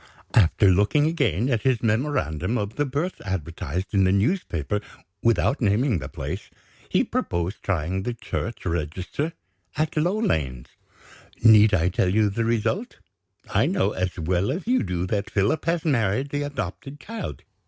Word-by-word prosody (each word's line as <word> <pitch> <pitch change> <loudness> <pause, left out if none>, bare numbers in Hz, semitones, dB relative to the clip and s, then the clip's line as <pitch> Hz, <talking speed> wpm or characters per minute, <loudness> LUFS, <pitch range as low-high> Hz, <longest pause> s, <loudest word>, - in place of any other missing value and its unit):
After 100 0 +5
looking 105 +11 +3
again 130 - +1
at 120 -5 +1
his 130 -4 +1
memorandum 110 - 0
of 105 0 -3
the 145 -1 0
birth 145 +8 -3
advertised 90 -1 -4
in 100 -1 +4
the 95 - +4
newspaper 105 - 0 0.4
without 115 +4 +2
naming 110 - +2
the 65 -1 -7
place 75 +9 -5 0.4
he - - +3
proposed 85 +4 -2
trying 90 0 -1
the 120 +4 -3
church 115 0 -5
register 90 - -2 0.4
at 155 +1 0
Low 175 +7 +1
Lanes. 70 - -1 0.7
Need 110 -2 +7
I 85 0 +2
tell 90 0 +1
you 105 +1 +3
the 115 +3 -1
result? 120 - -1 0.5
I - - +2
know, 175 - +1
as 90 -2 -2
well 90 +6 0
as 175 +7 -4
you 255 +2 +2
do, 90 0 -2
that 100 +2 -2
Philip 105 +9 +1
has 165 0 0
married 130 -2 +1
the 145 - -1
adopted 140 0 -5
child. 225 +1 -6
105 Hz, 155 wpm, -24 LUFS, 90-145 Hz, 0.7 s, Need